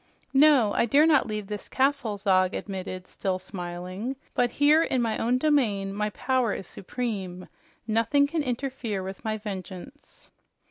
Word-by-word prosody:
"No, 270 -6 +5
I - - +2
dare 285 +6 +5
not 310 -3 +4
leave 215 -2 -3
this 210 0 -7
castle," 265 -6 +1
Zog 190 -2 +2
admitted, 185 -2 -5
still 190 -1 -2
smiling. 185 +6 -6 0.2
"But 245 -1 +2
here 290 +5 +4
in 265 -5 +1
my 225 -2 0
own 245 +2 +2
domain 230 -10 +1
my 210 +1 -1
power 250 +1 0
is 195 - -6
supreme. 190 -3 -5 0.4
Nothing 230 +6 +3
can 315 +2 -1
interfere 250 -6 -3
with 190 +2 -7
my 220 -1 -1
vengeance." 205 +6 -9
220 Hz, 150 wpm, -26 LUFS, 195-265 Hz, 0.4 s, No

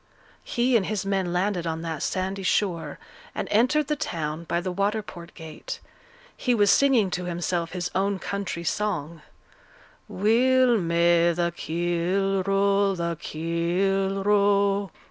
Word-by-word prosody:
He 245 +1 +1
and 200 -5 +2
his 210 -2 -2
men 195 -3 -1
landed 180 -1 -1
on 165 0 -3
that 160 -3 -4
sandy 190 +1 -2
shore, 185 -2 -1 0.4
and - - -3
entered 255 +8 +3
the 300 +2 -1
town 165 - -4
by 170 - -1
the 185 +1 -3
water 205 +4 0
port 175 -3 -11
gate; 165 - -8 0.6
he 250 -2 0
was 205 -3 +4
singing 245 -8 +3
to 180 0 -3
himself 175 -1 -2
his 180 -1 -3
own 195 +1 0
country 195 -3 -4
song, 170 -5 -2 0.9
Weel 240 +4 +3
may 170 0 +3
the 170 0 -1
keel 175 +4 0
row, 195 0 +2
the 170 -1 -2
keel 185 +4 -1
row, 200 -1 +2
&C. - - -29
190 Hz, 145 wpm, -25 LUFS, 170-205 Hz, 0.9 s, was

